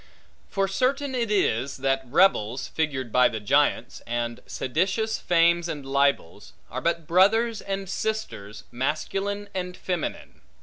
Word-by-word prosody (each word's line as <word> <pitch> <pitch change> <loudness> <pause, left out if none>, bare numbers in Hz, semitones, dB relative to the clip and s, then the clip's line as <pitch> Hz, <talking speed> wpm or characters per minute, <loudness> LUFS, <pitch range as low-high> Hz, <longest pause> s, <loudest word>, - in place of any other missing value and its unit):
For 195 -1 0
certain 265 +7 0
it 235 -3 -1
is, 140 - +1
that 135 0 +1
rebels, 130 - +2
figured 135 -7 -2
by 125 +2 +5
the 110 - -4
giants, 105 - +1
and 120 0 -2
seditious 190 - -1
fames 170 0 +3
and 145 -4 -5
libels, 140 -9 0 0.2
are - - -4
but 170 -1 0
brothers 210 +6 +3
and 195 0 -4
sisters, 180 - -4
masculine 195 +10 -2
and 180 -1 -4
feminine. 180 -4 -4
170 Hz, 130 wpm, -25 LUFS, 130-195 Hz, 0.2 s, by